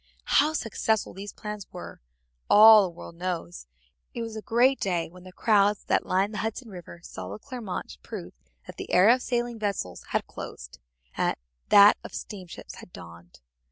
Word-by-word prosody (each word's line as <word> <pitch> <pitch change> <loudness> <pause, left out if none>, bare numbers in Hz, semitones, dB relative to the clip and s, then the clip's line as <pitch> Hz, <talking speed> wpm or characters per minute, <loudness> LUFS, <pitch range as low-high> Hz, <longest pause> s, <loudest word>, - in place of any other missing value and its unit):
How 305 +2 0
successful 220 -5 -1
those 200 +2 -8
plans 210 -2 -8
were 180 - -9 0.5
all 215 0 +9
the 190 - -1
world 170 0 -11
knows. 165 - -5 0.5
It 235 - -3
was 225 -1 -6
a 220 - -5
great 250 +5 +3
day 175 -4 -1
when 180 +1 -15
the 185 - -11
crowds 205 0 +2
that - - 0
lined 195 +3 +1
the 210 - -4
Hudson 225 +2 -4
River 175 -2 -11
saw 90 - -8
the 100 - -6
Clermont 220 - -7
prove - - -8 0.3
that - - -11
the - - -7
era 200 +6 +6
of 255 - -1
sailing 240 -2 -2
vessels 200 - -3
had - - 0
closed, - - -9 0.4
and - - 0 0.3
that 205 0 +8
of - - -9
steamships 185 -5 -9
had - - -13
dawned. 85 - -13
200 Hz, 175 wpm, -26 LUFS, 175-225 Hz, 0.5 s, all